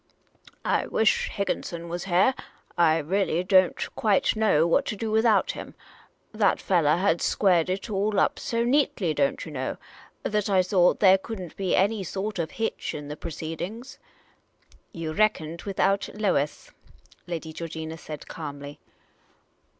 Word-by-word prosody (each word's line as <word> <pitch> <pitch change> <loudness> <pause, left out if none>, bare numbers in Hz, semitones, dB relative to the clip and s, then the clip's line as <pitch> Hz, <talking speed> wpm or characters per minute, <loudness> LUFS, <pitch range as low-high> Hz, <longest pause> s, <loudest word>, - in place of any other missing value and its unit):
I - - +1
wish 220 0 +2
Higginson 170 -4 -3
was 175 +2 -4
heah. 190 +7 +3 0.4
I 165 -2 +4
really 175 +2 0
don't 185 -1 +3
quite 210 -1 +2
know 215 -8 +3
what 170 - +3
to - - -2
do 220 +1 -3
without 220 -2 +3
him. - - -9 0.6
That 210 -2 +2
fellah 165 -5 +2
had 175 -3 +1
squared 180 -4 +2
it 190 +4 -2
all 205 -1 0
up - - +1
so 230 0 -1
neatly, 240 - +1
don't 140 -2 0
yah 160 - -8
know, 130 -2 -3 0.5
that 210 -1 -1
I 190 -2 +4
thought 180 -1 +3
there 190 -1 +7
could 220 +1 -7
n't 180 -3 -8
be 190 -2 0
any 205 +1 +2
sort 195 +2 -4
of 160 -2 -1
hitch 225 +6 -3
in 145 -1 -7
the 150 - -5
proceedings." 170 - -6 0.9
"You 165 -2 -5
reckoned 170 -5 0
without 195 0 +1
Lois," 185 -9 -1 0.6
Lady 165 -2 -5
Georgina 160 -1 -6
said, 155 -2 -9
calmly. 145 -2 -8
185 Hz, 150 wpm, -26 LUFS, 160-205 Hz, 0.9 s, there